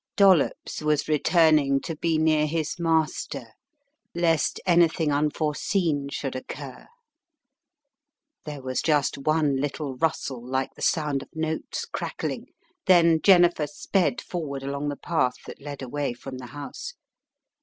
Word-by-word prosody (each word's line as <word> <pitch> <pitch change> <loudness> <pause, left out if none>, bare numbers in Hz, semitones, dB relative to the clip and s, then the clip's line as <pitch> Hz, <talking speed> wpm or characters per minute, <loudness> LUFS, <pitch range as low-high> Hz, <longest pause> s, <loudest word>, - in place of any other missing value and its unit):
Dollops 190 -8 +3
was 150 -1 +1
returning 155 -2 +4
to 165 - -5
be 165 +1 0
near 155 -1 +3
his 160 +1 -2
master, 160 -2 0 0.7
lest 165 -3 +1
anything 170 -3 +3
unforeseen 150 +1 0
should 135 -1 -4
occur. 130 +1 -8 1.6
There 145 -3 -7
was 130 -1 -1
just 145 -3 +1
one 150 -1 +1
little 140 0 -3
rustle 135 -5 -1
like 130 +1 -2
the - - -15
sound 150 -4 +1
of - - -12
notes 160 0 -3
crackling. - - -4 0.4
Then 170 -3 +5
Jennifer 175 -5 +5
sped 150 -1 0
forward 140 -6 -5
along 140 +1 -3
the 145 - -3
path 160 -7 0
that - - -10
led 140 -1 -7
away 140 0 -2
from 130 +2 -8
the 125 - -8
house. 145 - -8
150 Hz, 130 wpm, -25 LUFS, 140-165 Hz, 1.6 s, Then